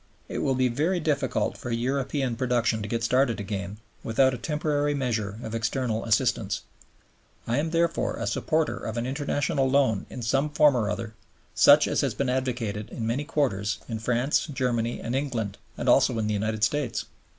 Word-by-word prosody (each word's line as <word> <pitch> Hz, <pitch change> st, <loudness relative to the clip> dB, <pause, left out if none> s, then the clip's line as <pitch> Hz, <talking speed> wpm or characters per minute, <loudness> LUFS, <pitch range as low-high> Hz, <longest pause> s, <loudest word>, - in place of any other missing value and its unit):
It -, -, -4 dB
will 135 Hz, -, +1 dB
be 130 Hz, 0 st, +3 dB
very 155 Hz, +10 st, 0 dB
difficult 150 Hz, -3 st, -1 dB
for 120 Hz, -, -6 dB
European 130 Hz, +2 st, -1 dB
production 115 Hz, -3 st, +1 dB
to 105 Hz, -, -4 dB
get 115 Hz, +2 st, -2 dB
started 125 Hz, 0 st, +2 dB
again 100 Hz, 0 st, -4 dB, 0.3 s
without 130 Hz, +4 st, +3 dB
a -, -, -3 dB
temporary 145 Hz, +1 st, 0 dB
measure 110 Hz, -7 st, -2 dB
of 110 Hz, -, -6 dB
external 115 Hz, 0 st, -1 dB
assistance. 115 Hz, -, +1 dB, 0.8 s
I 120 Hz, +4 st, 0 dB
am 160 Hz, +2 st, -1 dB
therefore 170 Hz, 0 st, +1 dB
a -, -, -4 dB
supporter 155 Hz, -1 st, 0 dB
of 110 Hz, +1 st, -5 dB
an 115 Hz, -, -1 dB
international 140 Hz, 0 st, 0 dB
loan 130 Hz, -7 st, +2 dB
in 125 Hz, -, -7 dB
some 135 Hz, +5 st, +2 dB
shape 150 Hz, -, -12 dB
or 150 Hz, -1 st, +8 dB, 0.2 s
form, 115 Hz, -1 st, -7 dB, 0.4 s
such -, -, +7 dB
as -, -, +1 dB
has -, -, -1 dB
been 140 Hz, -2 st, -1 dB
advocated 120 Hz, -5 st, -2 dB
in 115 Hz, -, -5 dB
many 125 Hz, +6 st, -1 dB
quarters 105 Hz, -10 st, 0 dB
in 115 Hz, -2 st, -4 dB
France, 125 Hz, +8 st, +1 dB
Germany, 120 Hz, -5 st, -1 dB
and 120 Hz, +2 st, -3 dB
England, 120 Hz, -8 st, -2 dB, 0.2 s
and -, -, -4 dB
also -, -, +4 dB
in 110 Hz, -, 0 dB
the 105 Hz, -, 0 dB
United 110 Hz, +1 st, -1 dB
States. 130 Hz, 0 st, 0 dB
125 Hz, 180 wpm, -26 LUFS, 110-140 Hz, 0.8 s, or